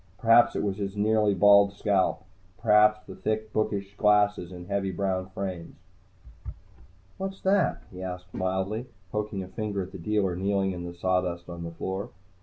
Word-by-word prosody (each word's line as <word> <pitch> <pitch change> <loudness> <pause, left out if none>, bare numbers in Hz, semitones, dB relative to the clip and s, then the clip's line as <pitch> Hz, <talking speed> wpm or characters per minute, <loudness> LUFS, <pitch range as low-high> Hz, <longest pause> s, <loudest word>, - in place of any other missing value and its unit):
Perhaps 115 +3 +5
it - - -1
was 100 -1 -1
his 100 0 -4
nearly 105 -1 +2
bald 100 +1 +6
scalp, 95 -3 +1 0.4
perhaps 105 0 +4
the - - -9
thick, 110 0 -3
bookish 100 -2 -1
glasses 105 -4 +3
in 90 -1 -9
heavy 100 0 -1
brown 95 0 -2
frames. 95 -3 -5 1.4
"What's 195 0 -5
that?" 195 0 +2
he 90 0 -9
asked 90 0 -7
mildly, 95 +6 -2 0.2
poking 105 -2 -3
a - - -9
finger 100 0 -3
at 95 - -10
the 95 - -9
dealer 95 0 0
kneeling 95 +1 0
in 90 -1 -6
the 85 0 -7
sawdust 90 -1 -1
on 85 0 -7
the 85 - -4
floor. 95 +4 -4
100 Hz, 165 wpm, -27 LUFS, 95-105 Hz, 1.4 s, bald